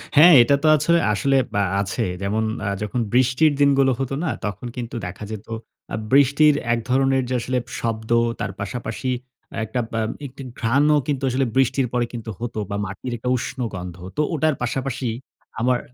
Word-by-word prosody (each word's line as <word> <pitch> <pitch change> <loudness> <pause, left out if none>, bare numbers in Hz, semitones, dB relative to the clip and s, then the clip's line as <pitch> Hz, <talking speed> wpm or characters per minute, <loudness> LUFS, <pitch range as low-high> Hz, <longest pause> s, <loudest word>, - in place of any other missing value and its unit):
হ্যাঁ, 170 +4 +9
এটা 140 - +3
তো - - +4
আছো 150 +2 +1 0.2
আসলে 135 +7 +1 0.2
অ্যা 100 - +2 0.2
আছে। 100 -1 -2 0.2
যেমন 105 +3 0 0.2
আ - - -1
যখন 105 +4 -2
বৃষ্টির 130 +5 +4
দিনগুলো 135 -1 +4
হতো 135 0 -2
না? 170 - 0 0.2
তখন 105 +4 -4
কিন্তু 120 -2 -5
দেখা 90 +4 -7
যেত 110 -1 -7 0.5
আ - - +1 0.2
বৃষ্টির 140 +2 +5 0.2
এক 120 - 0
ধরনের 135 0 +3
যে - - -1
আসলে 125 +2 -1 0.2
শব্দ 110 -1 -3 0.3
তার 95 - -2
পাশাপাশি 115 +4 -4 0.5
একটা 125 +3 -3
বা 115 - -1 0.3
একটি 135 +1 -11 0.2
ঘ্রাণও 140 +6 +3
কিন্তু 140 -2 -1
আসলে 130 +2 +1
বৃষ্টির 135 0 +2
পরে 120 -1 +1
কিন্তু 115 -2 -6
হতো 120 -1 -4
বা 100 - -2
মাটির 100 +6 -6
একটা 125 +2 -3
উষ্ণ 130 +2 -5
গন্ধ। 90 -2 -6 0.2
তো - - +3
ওটার 155 -1 +2
পাশাপাশি 130 +1 -2 0.5
আমার 125 +2 +2
125 Hz, 175 wpm, -22 LUFS, 110-135 Hz, 0.5 s, হ্যাঁ